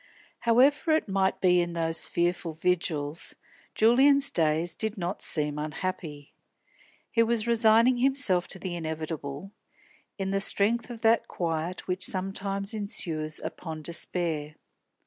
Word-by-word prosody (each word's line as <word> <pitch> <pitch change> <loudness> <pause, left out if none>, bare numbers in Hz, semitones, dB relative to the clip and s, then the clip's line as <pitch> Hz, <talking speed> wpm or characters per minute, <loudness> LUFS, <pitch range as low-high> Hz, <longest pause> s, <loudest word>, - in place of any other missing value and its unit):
However 275 +7 +3
it 310 - +1
might 190 -1 0
be 180 -1 +4
in 175 0 -3
those 165 -1 -1
fearful 175 -1 -1
vigils, 160 -2 -1 0.4
Julian's 275 +5 +4
days 160 - 0
did 220 0 -2
not 180 +1 -4
seem 150 -1 0
unhappy. 155 -2 -5 0.8
He 230 - +3
was 230 -1 +1
resigning 230 +1 +4
himself 250 -9 +3
to - - -6
the 185 -1 -5
inevitable, 160 0 -5 0.7
in 195 -1 -3
the 195 0 0
strength 225 +5 +2
of 235 -2 -8
that 225 +1 +3
quiet 165 +1 -3
which 185 0 -2
sometimes 195 +2 -2
ensues 170 -8 -1
upon 160 -3 -6
despair. 160 -2 -2
185 Hz, 125 wpm, -27 LUFS, 160-220 Hz, 0.8 s, be